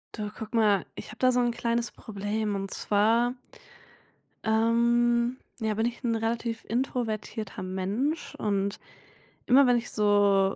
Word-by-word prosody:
Du, 210 -2 -4
guck 220 +2 -8
mal, 205 -4 +3
ich - - -8
habe 215 - -10
da 255 0 +4
so 250 - +2
'n 240 -1 +2
kleines 235 0 -1
Problem 210 0 -3
und 195 0 -4
zwar 230 +4 +2 1.1
ähm, 235 +2 +2 0.2
ja 220 -2 0
bin 220 +2 0
ich 235 0 -3
'n 230 -2 +1
relativ 225 0 -2
introvertierter 225 -4 -3
Mensch 200 - -2
und 200 -1 -1 0.7
immer 265 +2 +6
wenn 245 -1 +4
ich 235 - -3
so 205 -2 +3
225 Hz, 140 wpm, -27 LUFS, 205-240 Hz, 1.1 s, immer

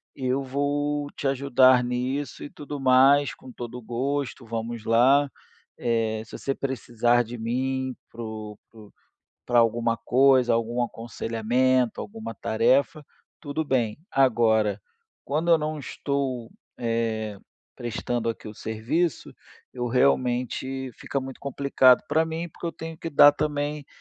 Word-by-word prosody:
eu 130 0 -1
vou 145 +2 -1
te 140 - -3
ajudar 130 -2 +4
nisso 125 +4 -3
e - - -7
tudo 145 0 -7
mais, 135 +2 +5
com 130 - -13
todo 120 0 -7
o 125 - -8
gosto, 130 +2 -3
vamos 115 0 -4
lá. 135 +5 +4 0.5
Eh, 115 -2 0
se - - -9
você 135 - -2
precisar 120 -3 +1
de 120 +1 -8
mim 130 +3 -2 0.2
para 120 - -9
o 110 -2 -7
para 115 - -20
o 105 - -16 0.5
para 120 -1 +3
alguma 115 0 +1
coisa, 130 +1 +4
algum 115 +1 0
aconselhamento, 120 +2 0
alguma 220 - -7
tarefa, 135 +10 +1 0.4
tudo 155 +1 -3
bem. 120 -7 0
Agora, 110 -6 +3 0.5
quando 155 +5 0
eu 165 - +7
não 155 0 -3
estou, 135 -4 -3 0.3
eh, 115 -3 -2 0.4
prestando 120 0 -3
aqui 115 - -5
o 105 - -6
serviço, 120 +10 -2 0.4
eu, 125 -1 -3
realmente 130 +1 0
fica 140 - -4
muito 135 0 -8
complicado 140 -2 +4
para 160 +1 +2
mim 165 +2 -4
porque 170 - -7
eu 165 - -3
tenho 160 0 -8
que 165 - -5
dar 145 -1 +7
também, 145 -1 -2
130 Hz, 140 wpm, -25 LUFS, 115-140 Hz, 0.5 s, eu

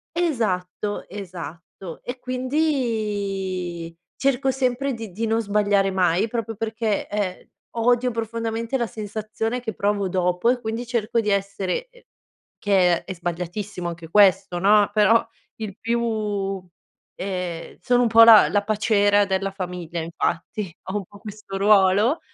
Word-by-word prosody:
Esatto, 210 - -1
esatto, 175 -2 -9
e 250 +1 -6
quindi 210 - -2 0.2
cerco 270 -1 +1
sempre 260 +1 0
di 225 -4 -7
di 220 +6 -3
non 225 +1 +1
sbagliare 205 -2 +2
mai 185 +2 +2
proprio 225 -1 -4
perché, 220 -1 -2
ehm, 200 -3 -3 0.3
odio 245 +2 +2
profondamente 230 +1 -3
la 235 -2 -1
sensazione 215 +2 -4
che 220 -2 -4
provo 200 -1 0
dopo 180 +3 +1
e 250 0 +2
quindi 230 +1 -4
cerco 235 -1 0
di 215 -2 0
essere, 200 - -1
ehm - - -21 0.6
che 185 -4 +3
è 190 - -5
sbagliatissimo 180 +2 -4
anche 170 -1 -7
questo, 190 -2 +4
no, 205 +2 +5
però 220 +2 +4 0.4
il 205 -2 -5
più 215 -4 -1 0.5
ehm, 180 -3 -5
sono 245 -1 +2
un 245 - +3
po' 230 +1 +8
la 225 -2 +8
la 205 -1 +1
paciera 205 -1 +3
della 195 0 -1
famiglia, 180 -3 -5
infatti. 170 +4 -3 0.2
Ho 205 - -1
un 200 - -5
po' 205 +3 -16
questo 210 -2 -9
ruolo, 205 - +4
210 Hz, 135 wpm, -23 LUFS, 190-230 Hz, 0.6 s, po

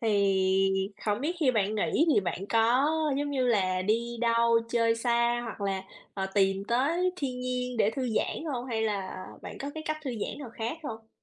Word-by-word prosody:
Thì 195 -2 +2 0.2
hổng 210 +1 +1
biết 325 +6 -1
khi 280 -5 +4
bạn 215 -3 +1
nghỉ 255 +9 +2
thì - - +5
bạn 185 +1 -3
có, 235 +5 +3 0.3
giống 290 0 -1
như 260 -3 +1
là, 185 -5 +2
đi 230 +4 0
đâu 230 0 +4
chơi 230 -1 +3
xa, 235 0 +2
hoặc 220 -2 -7
là, 195 -1 -1 0.3
ờ, 195 -1 -2
tìm 195 -1 +2
tới 315 - +1
thiên 260 -6 -3
nhiên 250 0 -2
để 215 -2 +3
thư 255 +2 -2
giãn - - -1
hông? 245 0 -4
Hay 225 -3 -1
là 195 -3 -2 0.2
bạn - - -8
có 280 - -4
cái 315 - -5
cách 310 - 0
thư 265 - -2
giãn 225 +2 -4
nào 275 -5 -7
khác 235 +7 -4
hông? 225 -6 -7
230 Hz, 205 wpm, -29 LUFS, 200-250 Hz, 0.3 s, thì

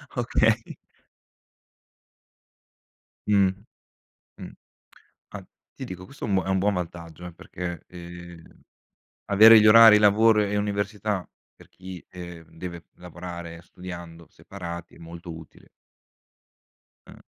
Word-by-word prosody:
Okay. 115 -2 0 2.5
Mh, 100 -2 +4 0.9
mh. - - -9 0.8
Ah, - - -10 0.3
ti - - -8
dico, 90 0 -8
questo 140 +9 -11
è - - -3
un 95 -2 +1
è - - -6
un 95 0 +1
buon 100 +2 +1
vantaggio, 85 -1 -7
eh, 90 - -9
perché, 85 +1 -7
ehm, 85 -1 -11 0.8
avere 110 +2 +8
gli 110 - +4
orari 110 0 +9
lavoro 105 +1 +4
e 105 0 -2
università, 100 -2 -2 0.3
per - - -19
chi, 95 -1 -11
ehm, 85 -2 -11
deve 85 0 -8
lavorare, 85 -1 -9
studiando, 85 -2 -10
separati, 85 -3 -9
è - - -18
molto 85 0 -10
utile. 80 -1 -15 1.4
Mh. - - -14
90 Hz, 115 wpm, -25 LUFS, 85-105 Hz, 2.5 s, orari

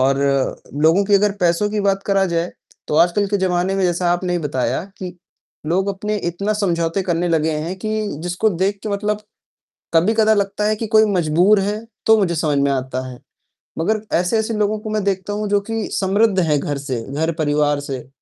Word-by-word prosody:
और 135 +1 +3 0.7
लोगों 165 +6 +4
के 205 0 +2
अगर 205 +1 +3
पैसों 175 +4 +2
की 210 - -1
बात 195 -1 +1
करा 195 -1 +3
जाए 170 +1 0 0.4
तो - - -1
आजकल 175 +5 +3
के 205 - +1
जमाने 185 0 0
में 195 - 0
जैसा 175 0 +1
आपने 180 0 -1
ही 175 - +1
बताया 135 -2 -1
कि 180 -1 -7 0.5
लोग 190 +5 +1
अपने 210 +2 -2
इतना 200 +5 -2
समझौते 175 -3 0
करने 175 -1 0
लगे 160 -1 +1
हैं 160 +4 -3
कि 215 +3 -4 0.3
जिसको 180 +5 0
देख 195 +2 -1
के - - -4
मतलब 210 +1 -1 0.7
कभी-कदा 220 +6 +4
लगता 200 0 -1
है 215 - +2
कि 220 +1 -4
कोई 220 0 +5
मजबूर 180 +4 +3
है, 210 +3 -2 0.2
तो 220 0 +6
मुझे 185 -5 +1
समझ 150 -3 0
में 140 0 +2
आता 130 -1 -2
है। 125 -1 -10 0.6
मगर 215 +6 0 0.2
ऐसे-ऐसे 220 +6 0
लोगों 215 0 0
को 215 - -7
मैं 215 -1 -1
देखता 195 +1 -1
हूँ 210 0 -2
जो 205 0 +3
कि 225 -1 -2
समृद्ध 195 +1 +2
है 155 -4 +2
घर 145 0 -3
से, 135 -4 -4
घर 160 +3 0
परिवार 145 -1 +1
से, 135 -3 -6
185 Hz, 200 wpm, -20 LUFS, 165-205 Hz, 0.7 s, तो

